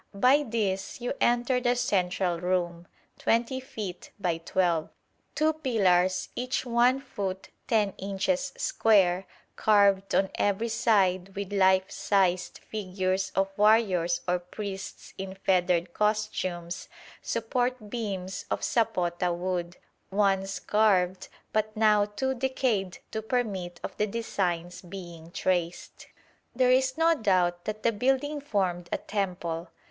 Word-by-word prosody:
By 255 +8 +5
this 215 -7 -2
you 245 - -2
enter 240 +1 +3
the 245 0 +2
central 180 -5 0
room, 175 -1 -1 0.3
20 235 +3 +1
feet 210 -8 -7
by 175 -4 0
12. 170 -2 0 0.5
Two 315 +1 +2
pillars, 190 - +2
each 255 +1 -2
1 245 +2 +3
foot 195 -8 -5 0.2
10 210 -4 +2
inches 270 +9 -1
square, 190 -4 +3 0.3
carved 200 -2 +3
on 195 0 +2
every 205 +3 +1
side 195 -5 +2
with 200 0 -4
life 190 -1 +3
sized 185 -3 +1
figures 190 -2 -2
of 195 0 +1
warriors 200 -5 +3
or 180 0 +2
priests 195 +2 -7
in 190 0 -5
feathered 180 -2 +1
costumes, 200 -5 -1 0.3
support 240 -1 -2
beams 195 -5 -4
of - - -1
sapota 180 -6 +1
wood, 175 0 -3 0.3
once 195 -1 +1
carved, 190 -4 +2 0.3
but 215 0 0
now 210 -1 +4
too 265 +6 -2
decayed 245 -7 -1
to 220 - -3
permit 205 -7 -2
of - - -5
the 210 - +1
designs 180 -5 -2
being 175 -3 -9
traced. 175 -1 -2 0.5
There 255 0 +4
is 260 +1 +2
no 330 +1 +5
doubt 185 - +1
that 215 0 -4
the 230 - +4
building 270 +6 0
formed 185 -9 -1
a - - +1
temple. 180 -4 -3
195 Hz, 125 wpm, -28 LUFS, 180-230 Hz, 0.5 s, By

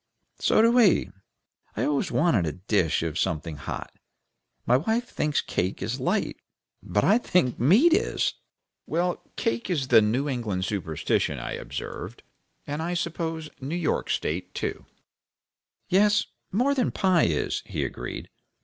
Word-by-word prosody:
"So - - +4
do 230 - +6
we. 235 -6 +4 0.7
I - - +1
always 145 -2 0
want 125 - +2
a 75 - -2
dish 90 -3 0
of 80 -1 -2
something 80 -1 -2
hot. 75 - -6 0.7
My 125 - +4
wife 220 - 0
thinks 150 -1 0
cake 95 +1 -2
is 115 +7 -3
light, 130 - 0 0.4
but 100 +3 0
I 215 +4 +5
think 175 - +1
meat 215 - +5
is." 430 +6 +1 0.5
"Well, 175 +2 0
cake 115 +8 -1
is 145 -8 -1
the 115 -2 +7
New 120 +7 +1
England 110 -9 -2
superstition," 80 -8 -1
I - - -5
observed. - - -6 0.4
"And 145 +2 -3
I 175 +2 -2
suppose 165 -2 -3
York 155 +5 -1
State, 90 +4 -2
too." - - -4 1.0
"Yes, 205 +2 +4 0.3
more 250 +8 +2
than 255 -4 +1
pie 185 -4 +3
is," 80 -3 -1
he - - -2
agreed. - - -6
145 Hz, 140 wpm, -26 LUFS, -, 1.0 s, the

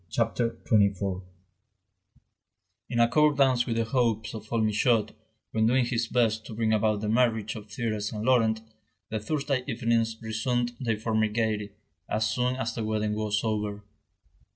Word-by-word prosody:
CHAPTER 115 +7 0
XXIV 100 -3 +2 1.7
In 120 - -1
accordance 135 0 +4
with 115 - -1
the 115 - +1
hopes 110 -2 0
of 110 -1 -9
old 115 -2 +1
Michaud, 110 +1 +2 0.4
when 110 0 +2
doing 125 +1 +3
his 120 -1 -1
best 110 -3 +1
to 110 - -8
bring 110 -1 +1
about 105 -1 +1
the 105 - -2
marriage 110 -2 +1
of 105 -1 -9
Thérèse 105 -1 -3
and 105 0 -4
Laurent, 115 -4 +3 0.5
the 110 - -1
Thursday 140 +2 -1
evenings 115 -1 0
resumed 120 +2 -1
their 115 -4 -1
former 110 0 +1
gaiety, 105 -2 -1 0.4
as 110 +1 +1
soon 125 +2 0
as 115 -3 -2
the 115 - -3
wedding 110 -1 -1
was 105 -1 -1
over. 105 -2 -2
110 Hz, 150 wpm, -27 LUFS, 110-120 Hz, 1.7 s, accordance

